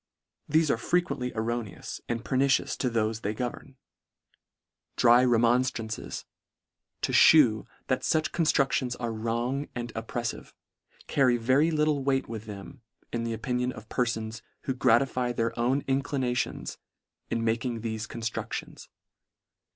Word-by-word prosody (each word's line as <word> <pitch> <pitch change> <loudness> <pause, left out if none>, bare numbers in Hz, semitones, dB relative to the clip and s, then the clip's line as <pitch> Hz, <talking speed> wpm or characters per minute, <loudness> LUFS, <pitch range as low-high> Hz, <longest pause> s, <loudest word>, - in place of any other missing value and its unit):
Thefe 155 0 +3
are - - +1
frequently 175 -3 0
errone 115 -1 -3
ous - - -7
and 115 -2 -2
pernicious 130 0 +2
to 125 - 0
thofe 110 -1 0
they 105 +1 -2
govern 125 +3 -5 0.6
— - - -56
Dry 120 +1 +6
remonftrances, 120 -1 +1 0.8
to - - +1
(hew 125 -9 +6 0.2
that 130 - 0
fuch 155 -1 +1
con 165 - 0
structions 135 -4 +2
are 120 -2 -2
wrong 120 +5 -2
and 120 -1 -5
oppreffive, 115 +1 -4 0.5
carry 130 -3 +3
very 130 +7 +3
little 150 -3 +1
weight 135 -1 +1
with 110 -1 -6
them, 100 -1 -9 0.3
in 115 -1 -1
the 115 - -2
opinion 125 +3 -1
of 110 -3 -11
perfons, 115 -2 -2 0.2
who 135 - -1
gratify 125 0 +2
their 115 -1 0
own 130 +4 +1
inclinati 135 -2 0
ons - - -8 0.5
in 115 - -1
making 115 +1 -1
thefe 110 -1 -3
constructions. 115 0 -5
120 Hz, 135 wpm, -28 LUFS, 115-135 Hz, 0.8 s, Dry